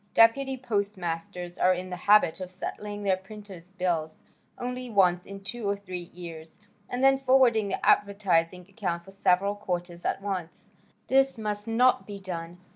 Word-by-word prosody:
"Deputy 265 +4 +5
postmasters 180 -6 -3
are 185 0 +4
in 185 +1 -6
the - - -2
habit 210 -5 +6
of 185 -1 -5
settling 205 +2 -6
their 195 -2 +3
printer's 190 -2 -12
bills 170 -4 -2 0.3
only 250 0 -4
once 180 -4 +3
in 195 0 -8
two 220 +1 -4
or 200 - +1
three 180 -3 -7
years 165 -2 -8 0.3
and 245 +1 -2
then 270 0 +5
forwarding 255 -5 +4
the - - -3
advertising 185 -4 +2
account 180 -4 -3
for 195 - -12
several 195 +1 +2
quarters 175 -3 -4
at - - 0
once. 190 -4 -5 0.3
This 270 0 +3
must 210 -1 -3
not 245 +3 +3
be 200 -1 -7
done. 175 -2 -6
195 Hz, 160 wpm, -27 LUFS, 180-215 Hz, 0.3 s, habit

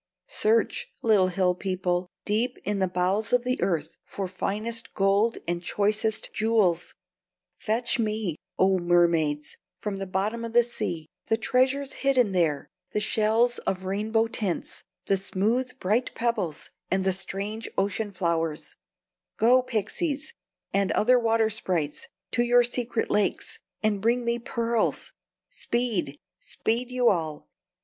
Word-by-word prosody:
Search, 465 +2 +1 0.2
little 210 -5 +4
hill 185 0 +2
people, 180 -1 -1 0.2
deep 230 +4 0
in 205 -1 -1
the 190 - +2
bowels 185 +5 0
of 245 -1 +3
the 255 +1 -1
earth 165 -4 -1
for 195 -2 -5
finest 215 +5 -3
gold 200 +3 +2
and 175 0 -1
choicest 210 +4 0
jewels; 210 -6 +1 0.6
fetch 235 +3 0
me, 215 -6 -1 0.2
O 190 0 +4
mermaids, 170 -4 +2 0.2
from 205 -2 -3
the 195 0 -4
bottom 205 +5 -1
of 230 -1 -5
the 240 0 +6
sea 170 -9 -4 0.2
the 225 - +2
treasures 260 +4 +1
hidden 255 -6 +3
there, 165 -6 +1 0.3
the - - +1
shells 220 +3 +2
of 190 0 -2
rainbow 215 +4 +1
tints, 220 -5 -3 0.2
the 195 - +2
smooth, 230 +7 -1
bright 220 +7 0
pebbles, 205 -10 -2 0.2
and 190 0 +1
the 190 0 +2
strange 200 +4 -3
ocean 205 +2 0
flowers; 165 -4 -2 0.6
go, 250 +3 +5
pixies, 280 - -2 0.4
and 200 -1 +2
other 250 +3 +4
water 225 -1 +2
sprites, 170 -8 -2 0.2
to 240 - +2
your 240 0 +5
secret 240 -1 -1
lakes, 205 -1 0 0.2
and 210 -2 +1
bring 235 +3 +1
me 235 0 0
pearls! 235 -1 -1 0.4
Speed! 235 - -1 0.2
speed 240 +3 -2
you 250 -1 +1
all! 160 -5 -2
215 Hz, 135 wpm, -26 LUFS, 185-235 Hz, 0.6 s, the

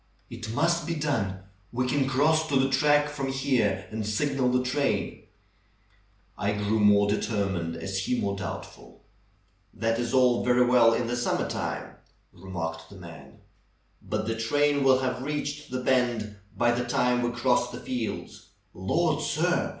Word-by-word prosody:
"It 115 -1 -7
must 170 +3 +1
be 170 - -1
done! 110 -12 -1 0.3
We 125 +1 -1
can 135 +1 +1
cross 155 +4 +2
to 140 -3 +2
the 135 0 +1
track 145 +2 +3
from 145 -2 -4
here 130 -7 0
and 110 0 -3
signal 130 +5 0
the 125 0 +2
train." 140 +3 -1 1.1
I 105 0 0
grew 105 +1 0
more 100 -1 +5
determined 100 -6 -1
as 95 +4 -3
he 120 +6 -1
more 100 0 -1
doubtful. 100 -2 -8 0.7
"That 115 +2 0
is 120 -1 -2
all 125 -2 +3
very 125 0 +4
well 120 -2 +5
in 120 - -1
the 120 +1 -2
summer 120 - 0
time," - - -4 0.4
re 95 0 -13
marked 80 -2 -5
the - - -13
man, 85 -3 -12 0.6
"but - - -3
the 115 - -1
train 145 +5 +1
will 135 -1 +5
have 125 -1 -2
reached 150 +1 -4
the 125 0 -4
bend 120 -5 +1 0.2
by 120 0 +3
the 120 +1 0
time 125 -1 +1
we 120 - 0
cross 120 0 +1
the 120 0 -8
fields. 125 -4 -5 0.3
Lord, - - 0
sir! - - 0
125 Hz, 165 wpm, -27 LUFS, 105-135 Hz, 1.1 s, more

